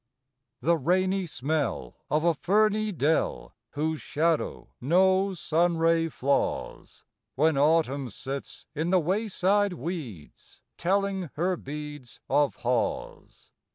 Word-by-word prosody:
The 170 +6 +3
rainy 185 +5 +1
smell 150 0 -2
of 155 +1 +1
a 170 0 +4
ferny 215 +6 +2
dell, 150 - 0 0.2
Whose 155 +1 -2
shadow 160 +1 -1
no 190 +6 +3
sunray 165 0 +2
flaws, 140 -1 -2 0.3
When 155 +3 +3
Autumn 140 -2 +2
sits 135 +5 -6
in 160 +2 -2
the 185 0 +4
wayside 200 +2 +1
weeds 140 - -7 0.2
Telling 195 -1 0
her 180 +4 +1
beads 145 -4 -8
Of 145 -1 +2
haws. 125 -1 -3
165 Hz, 105 wpm, -27 LUFS, 145-185 Hz, 0.3 s, a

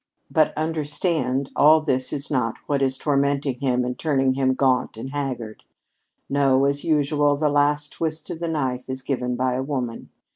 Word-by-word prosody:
"But 155 -1 +3
understand, 150 -3 -1
all 155 +2 +6
this 130 -4 -1
is 145 0 -4
not 120 -5 0
what 140 -2 0
is 130 -1 +1
tormenting 140 -2 0
him 125 -2 +1
and 125 0 -4
turning 135 -4 +2
him 130 -1 +1
gaunt 130 -4 +1
and 130 +4 -6
haggard. 130 -6 -4 0.6
No, 135 -1 +3
as 140 +1 0
usual, 145 -2 +2
the 150 0 +1
last 145 +1 +1
twist 160 -1 -3
of 165 - -6
the 170 - -2
knife 130 -5 -2
is 130 0 -5
given 125 -2 -2
by 130 0 0
a 130 - -1
woman. 130 -4 -4
140 Hz, 175 wpm, -23 LUFS, 130-150 Hz, 0.6 s, all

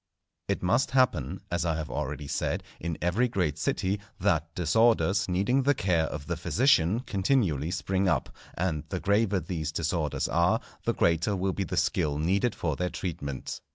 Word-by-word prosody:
_ - - +3
It - - -2
must 120 +9 +2
happen, 130 -1 +2
as 85 -1 0
I 80 -2 0
have 80 -1 -4
already 75 +2 -3
said, - - -1 0.2
in 85 -1 -3
every 100 +9 +2
great 90 -10 -1
city, 95 +5 0 0.2
that 80 0 0
disorders 100 +2 +3
needing 100 +9 +2
the 140 +2 +3
care 85 -7 +1
of 75 -2 -6
the 85 - -2
physician 105 - +3
continually 95 - +1
spring 95 +1 0
up; - - -1 0.2
and 80 -4 -1
the 95 - -2
graver 100 0 +2
these 80 -2 -3
disorders 80 -2 -1
are, 85 +1 +2 0.3
the - - +2
greater 85 +5 +2
will 95 0 -1
be 100 - -2
the - - -4
skill 75 -1 +1
needed 95 +9 +1
for 80 -4 -1
their 90 +4 -1
treatment. 70 -9 -5
90 Hz, 175 wpm, -28 LUFS, 80-100 Hz, 0.3 s, _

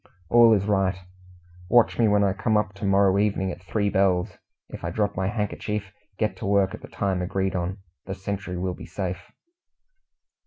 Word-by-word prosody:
"All 120 -1 +7
is 100 -2 +1
right. 95 -2 +1 0.7
Watch 120 -1 +4
me 115 - +5
when 105 -1 +3
I 100 -1 +2
come 110 +2 +1
up 105 -1 -1
to 100 +1 -6
morrow 100 0 +4
evening 100 -2 0
at 85 - -9
three 100 +3 -1
bells. 95 -2 +1 0.3
If - - -9
I 85 - -2
drop 105 +4 -1
my 95 0 -1
handkerchief, 105 -2 -3 0.2
get 110 -1 0
to - - -5
work 100 -1 +2
at - - -8
the - - -10
time 95 -3 -1
agreed 95 +1 -1
on. 90 +2 -2 0.3
The 95 - -4
sentry 95 -1 -4
will 90 0 -2
be - - -10
safe." 90 -2 -4
100 Hz, 190 wpm, -25 LUFS, 95-105 Hz, 0.7 s, All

